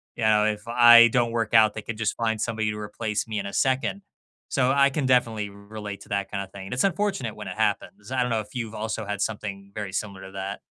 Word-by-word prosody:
Ya 110 -1 +3
know, - - +2
if 105 -1 -1
I 120 0 +8
don't 120 0 +1
work 115 -1 -2
out, 110 -2 +6
they 110 - -6
could 115 0 -6
just 110 -1 -1
find 110 -2 -1
somebody 110 -1 -1
to 105 - -6
replace 105 +1 -3
me 110 -1 -4
in 100 - -4
a 100 - -7
second. 135 +9 0 0.5
So, 130 -1 +2
I 140 0 +4
can 135 -1 -1
definitely 115 -5 +2
r 100 - -15
relate 105 0 -8
to - - -19
that 100 -1 -2
kind 100 - -2
of 95 - -12
thing. 95 -1 -9
It's 125 - 0
unfortunate 195 - -1
when 105 -3 -7
it 90 - -7
happens. 105 +1 -2
I 130 - +1
don't 125 - 0
know 110 - +1
if 105 +3 -9
you've 115 -3 -4
also 110 0 -3
had 105 -1 -4
something 100 -2 -4
very 105 -3 -4
similar 100 -2 -4
to 95 - -10
that. 95 +1 -5
110 Hz, 255 wpm, -25 LUFS, 105-120 Hz, 0.5 s, I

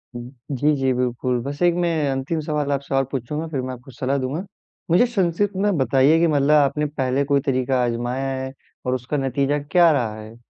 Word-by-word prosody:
हुँ। 120 0 -7 0.2
जी, 145 +3 +2
जी, 135 -1 +1
बिल्कुल। 125 0 -1
बस 145 +3 -6
एक 175 -1 +4
मैं 170 - +2 0.2
अंतिम 135 +4 -2
सवाल 150 -2 -1
आपसे 140 -1 -2
और 135 - +3
पूछूँगा, 150 +5 -3
फिर 145 -5 -3
मैं 130 0 -4
आपको 125 +2 -12
सलाह 130 +3 -1
दूँगा। 140 +8 -3 0.5
मुझे 180 +9 +5
संक्षिप्त 195 -2 0
में 200 -1 +1
बताइए 135 +3 +4
कि 170 - +4
मतलब 145 -2 +2
आपने 150 0 +3
पहले 140 -2 -1
कोई 140 0 +2
तरीका 130 -2 +1
आज़माया 120 +3 -2
है, 130 0 -6 0.3
और 125 0 +1
उसका 130 +4 -3
नतीजा 140 +2 0
क्या 170 +4 +4
रहा 120 -7 0
है? 110 +1 -11
140 Hz, 200 wpm, -22 LUFS, 130-150 Hz, 0.5 s, मुझे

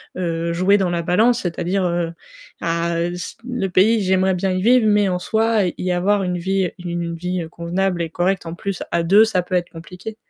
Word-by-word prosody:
heu, 170 -2 -2
jouer 185 +4 +3
dans 185 -3 0
la 170 - -1
balance, 220 +8 +2
c'est-à-dire, 180 +2 -1
heu, 170 -1 -1 0.5
ah, 170 0 -1
heu, 175 +1 -1
c 180 - -6
le 245 -6 -1
pays, 210 +5 +3
j'aimerais 190 0 +2
bien 190 +1 -1
y 185 0 -1
vivre, 240 +3 +4
mais 205 -1 +3
en 180 - 0
soit, 220 +2 +1
y 175 - -2
y - - +1
avoir 195 +3 +1
une 180 -1 -1
vie 190 +1 0
une 170 -1 -3
vie 180 +1 -3
convenable 175 +2 -2
et 165 - -2
correcte, 180 +3 -1
en 165 - -5
plus 195 +1 -4
à 170 - +1
2, 200 +6 +6
ça 220 -5 +1
peut 180 +1 -4
être 175 -1 0
compliqué. 180 +6 -9
180 Hz, 215 wpm, -20 LUFS, 170-195 Hz, 0.5 s, 2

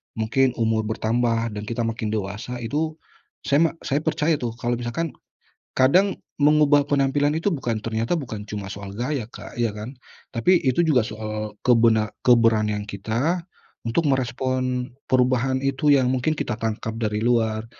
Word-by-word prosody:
mungkin 120 +3 +1
umur 110 -1 0
bertambah 115 +1 0
dan 105 0 -6
kita 115 0 -2
makin 115 -1 -2
dewasa, 105 +3 -4
itu 155 +6 -1 0.5
saya 155 +4 +3
me - - -2
saya 140 +2 0
percaya 155 -1 0
tuh 115 -2 -3
kalau 120 0 -2
misalkan 130 +7 -3 0.6
kadang 180 +10 +3 0.2
mengubah 145 -1 +4
penampilan 145 +1 +1
itu 165 +6 0
bukan 120 - -2
ternyata 115 +9 -1
bukan 110 -6 -6
cuma 100 -2 -6
soal 100 -1 -7
gaya, 125 +3 -2
Kak, - - -10
ya 115 -2 0
kan, 110 +6 -8 0.3
tapi 175 +9 +3
itu 135 +6 +2
juga 150 -6 +4
soal 110 -1 -5
kebena 115 -3 +4
keberanian 110 -4 +3
kita 115 - -1 0.4
untuk 130 +8 0
merespon 130 -1 -1 0.2
perubahan 130 +1 +2
itu 135 +2 +1
yang 135 -3 +5
mungkin 140 +4 0
kita 115 - -1
tangkap 110 0 -3
dari 105 -1 0
luar, 110 -1 +1
120 Hz, 150 wpm, -23 LUFS, 110-140 Hz, 0.6 s, yang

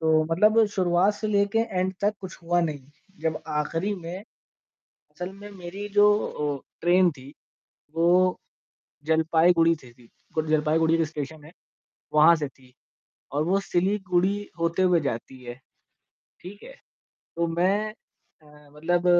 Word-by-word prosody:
तो 160 -1 +3
मतलब 215 +5 +5
शुरुआत 185 +2 +2
से 215 - -4
लेके 200 +1 +1
एंड 190 -5 -1
तक 205 +1 +1
कुछ 190 -2 -9
हुआ 175 +1 +1
नहीं, 155 -4 -2 0.4
जब 160 -1 -2
आख़िरी 165 +7 -2
में 175 -1 -7 0.7
असल 180 +1 -9
में 205 +1 -11
मेरी 195 +2 -7
जो 205 0 +6 0.5
अ, - - -28 0.2
ट्रेन 175 +1 +4
थी 140 -1 -13 0.6
वो 180 +2 +3 0.7
जलपाईगुड़ी 165 +1 +3
से 125 -2 -15
थी 120 -1 -21 0.2
गुड 155 0 -1
जलपाईगुड़ी 160 +1 +2
जो 165 - +1
स्टेशन 155 0 -7
है 155 - -13 0.6
वहाँ 155 +3 +7
से 150 -2 -3
थी। 130 -2 -22 0.6
और 145 +2 0
वो 190 +3 +2
सिलीगुड़ी 190 0 0 0.2
होते 170 +2 0
हुए 180 -2 +4
जाती 130 -1 -5
है। 120 +1 -8 0.8
ठीक 200 +3 -11
है? - - -12 0.6
तो 170 0 +1
मैं 190 +6 0 0.5
अ, 150 -1 -19
मतलब 175 +3 0
170 Hz, 140 wpm, -25 LUFS, 155-190 Hz, 0.8 s, वहाँ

